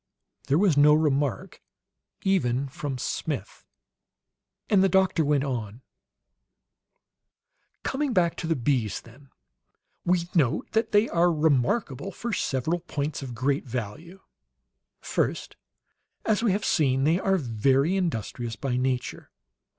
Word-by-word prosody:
There 140 - +3
was 185 -4 +3
no 150 +1 +7
remark, 145 -7 0 0.6
even 140 -9 +1
from 135 0 -5
Smith; - - -4 1.0
and 195 -2 +4
the 195 - +4
doctor 190 -2 +3
went 145 -2 +2
an: 120 -3 -4 2.0
"Coming 280 0 -1
back 175 -6 +2
to 165 - -4
the 165 - +1
bees, 120 -6 0
then, 130 +4 -18 0.7
we 175 -1 +1
note 145 -10 +1
that 225 0 0
they 210 +2 +4
are 175 +1 +3
remarkable 150 - 0
for 230 +4 -5
several 160 +2 -1
points 150 -4 -4
of 125 -3 -6
great 135 +4 0
value. 125 - -6 0.8
First, - - -2 0.7
as 215 0 +2
we 230 -4 +2
have 200 +2 -1
seen, 135 -5 +2
they 160 +5 +3
are 195 0 +2
very 135 - +1
industrious 120 - -2
by 125 0 -2
nature. 125 -1 -2
150 Hz, 125 wpm, -26 LUFS, 130-180 Hz, 2.0 s, no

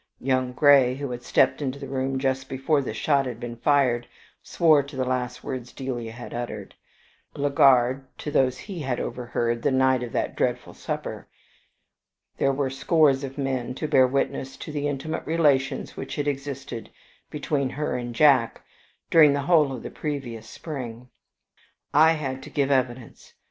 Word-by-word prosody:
Young 130 -1 0
Grey, 135 -2 +5
who 140 -1 -5
had 120 0 -5
stepped 130 +3 +2
into 135 -1 -2
the 140 -1 -7
room 135 0 -2
just 130 0 -1
before 135 +3 +1
the 135 - -4
shot 140 -3 +1
had 120 -2 -6
been 120 -1 -6
fired, 125 -3 +2 0.3
swore 155 -4 +4
to 140 +1 -11
the 130 -1 -1
last 125 -1 -2
words 125 -2 -5
Delia 120 -4 -5
had 120 +2 -9
uttered; 115 -4 -5 0.6
Legard 135 -2 +4 0.2
to 150 - -5
those 130 -2 +2
he 190 +1 -8
had 130 -5 -2
overheard 120 -1 -2
the - - +2
night 130 -1 +3
of 120 -2 -5
that - - -1
dreadful - - -1
supper: - - -5 1.1
there 135 - +2
were 135 -1 -1
scores 140 -1 +3
of 135 0 -6
men 130 -3 -2
to 155 - -3
bear 130 -3 +5
witness 135 0 -2
to 155 - -7
the 145 -1 -2
intimate 145 +3 -3
relations 150 -5 +1
which - - -6
had 145 -1 -2
existed 135 -4 -5 0.4
between 145 -2 -1
her 150 +3 -3
and 120 -1 -5
Jack 135 -5 +4 0.5
during 155 -3 +7
the 140 - 0
whole 155 -3 +4
of 125 -3 -6
the - - -6
previous 120 -7 -5
spring. 125 -6 -7 0.8
I 160 +2 +6
had 135 -4 -4
to - - -10
give 140 -1 0
evidence. 130 -2 -2
135 Hz, 170 wpm, -25 LUFS, 125-145 Hz, 1.1 s, during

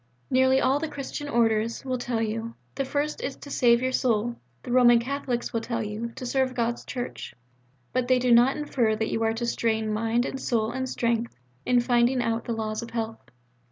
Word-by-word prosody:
Nearly 260 +1 +4
all 270 +2 +2
the 320 - -2
Christian 290 0 -6
Orders 230 -1 +1
will 255 -1 -1
tell 235 -2 -1
you: 225 +1 -3 0.2
the 275 - -2
first 290 +3 -2
is 270 - -3
to 285 - -11
save 240 -1 +4
your 260 - +1
soul. 235 -2 +1 0.3
The - - -6
Roman 240 -1 +6
Catholics 250 0 -2
will 230 - 0
tell 230 0 -2
you, 215 +3 -4
to 255 - -6
serve 260 0 0
God's 235 0 -1
Church. 245 -3 -6 0.6
But 255 -1 0
they 255 0 +4
do 250 0 +1
not 240 +4 +5
infer 250 -7 +1
that 220 +1 -2
you 225 - -1
are 225 0 +2
to 235 +1 -3
strain 220 -2 0
mind 225 +3 +1
and 270 - -4
soul 225 -2 0
and 260 +1 -3
strength 235 -1 -1 0.3
in 245 -1 +4
finding 245 +1 +2
out 230 -1 -1
the 235 - -2
laws 215 -1 -3
of 235 - -7
health. 225 -1 -5
240 Hz, 205 wpm, -26 LUFS, 225-255 Hz, 0.6 s, Roman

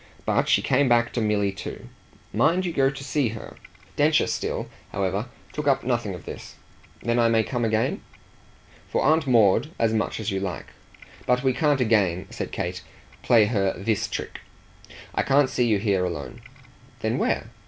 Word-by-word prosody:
But - - +1
she - - +4
came 140 -2 +2
back 120 0 +3
to 120 - -1
Milly 105 -2 +1
too. 95 - -8 0.5
"Mind 180 +4 +2
you 175 - -2
go 135 -3 +3
to 135 0 -7
see 140 -1 0
her." - - -10 0.4
Densher - - +3
still, - - -3 0.2
however, 100 +3 -1 0.3
took 150 -1 -4
up 140 - +3
nothing 120 -6 -1
of 90 - -12
this. - - -9 0.5
"Then 120 +1 +1
I 115 - +4
may 115 -1 +3
come 120 +1 -2
again?" 110 0 0 0.9
"For - - 0
Aunt 155 +1 +3
Maud 115 +2 +4
as 115 -1 +1
much 110 0 -1
as 110 - -2
you 95 - -1
like. 95 -2 -5 0.6
But 125 +1 +2
we 130 -1 +3
can't 145 -1 +2
again," 100 -7 +2
said - - -5
Kate, - - -3 0.4
"play 115 -3 +5
her 100 -3 0
THIS 100 +3 -1
trick. - - -5 0.7
I - - +1
can't 135 0 +3
see 125 - +1
you 110 -3 +3
here 100 -3 +1
alone." 75 -8 -5 0.6
"Then - - 0
where?" 110 - -1
115 Hz, 175 wpm, -25 LUFS, 100-130 Hz, 0.9 s, play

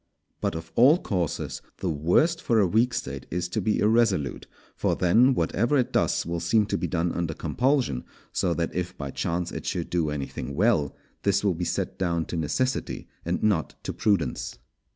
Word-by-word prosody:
But - - -1
of 80 0 -7
all 135 +8 +6
courses 90 - -2 0.2
the 90 -3 -1
worst 90 - +2
for 115 -2 +2
a 100 - +5
weak 115 +7 +3
State - - -4
is 90 +1 -2
to 110 +4 -1
be 105 +3 +1
irresolute; 105 -8 +2 0.3
for - - +1
then 120 +9 +4
whatever 115 - +1
it 125 - 0
does - - +2
will 85 0 -2
seem 105 +6 +3
to 100 - -1
be 90 - -1
done 85 +1 0
under 85 -2 -2
compulsion, 125 - 0 0.3
so 85 -2 +1
that 85 -1 -2
if 90 0 -3
by 70 -2 -5
chance 85 +4 -2
it - - -6
should - - -2
do 85 -3 +1
anything 70 -1 -4
well, 95 - +2 0.3
this 100 0 +2
will 100 -3 +3
be 90 +1 -3
set - - -2
down 85 -3 0
to - - -5
necessity 130 - -1 0.2
and - - -1
not 100 -7 +1
to - - -3
prudence. 100 - 0
90 Hz, 190 wpm, -26 LUFS, 85-115 Hz, 0.3 s, all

